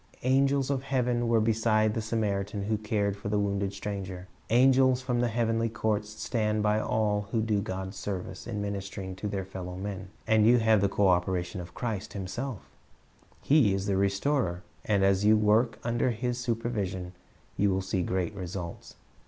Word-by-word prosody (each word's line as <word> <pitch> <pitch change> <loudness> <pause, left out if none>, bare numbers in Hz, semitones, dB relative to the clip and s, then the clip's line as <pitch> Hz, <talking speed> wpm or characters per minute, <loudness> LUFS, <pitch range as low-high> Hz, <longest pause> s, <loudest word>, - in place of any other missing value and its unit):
Angels 135 +1 +2
of 135 -2 0
heaven 125 -3 0
were 115 -1 +4
beside 110 -1 +2
the 115 - -2
Samaritan 105 -2 -1
who 105 +1 -1
cared 105 -2 0
for 100 0 -6
the 105 - +1
wounded 100 -1 0
stranger. 100 -2 -5 0.2
Angels 130 +1 +5
from 125 -2 -1
the 120 - +2
heavenly 115 0 0
courts 105 -1 -1
stand 105 -1 -1
by 105 0 +2
all 105 -2 0
who 115 - +1
do 110 -2 +1
God's 95 0 -5
service 95 0 -5
in 105 -3 -3
ministering 100 -1 -5
to 105 - -4
their 100 -2 -3
fellow 90 -1 -7
men. 95 0 -5 0.2
And 110 -1 +4
you 120 +1 +6
have 110 -3 +4
the 100 - +2
co 100 0 +2
operation 90 0 0
of 90 0 -11
Christ 110 -6 -4
Himself 100 - -5 0.8
He 130 -10 +4
is 95 0 -2
the 100 -1 +1
Restorer, 100 -1 0 0.2
and 100 -2 +2
as 95 0 +3
you 110 +1 +6
work 110 +3 +3
under 120 +2 +1
His 120 +1 -2
supervision, 105 -7 -2 0.4
you 100 - +2
will 95 0 0
see 95 -1 -1
great 90 +2 -1
results. 90 -3 -7
105 Hz, 175 wpm, -28 LUFS, 95-115 Hz, 0.8 s, you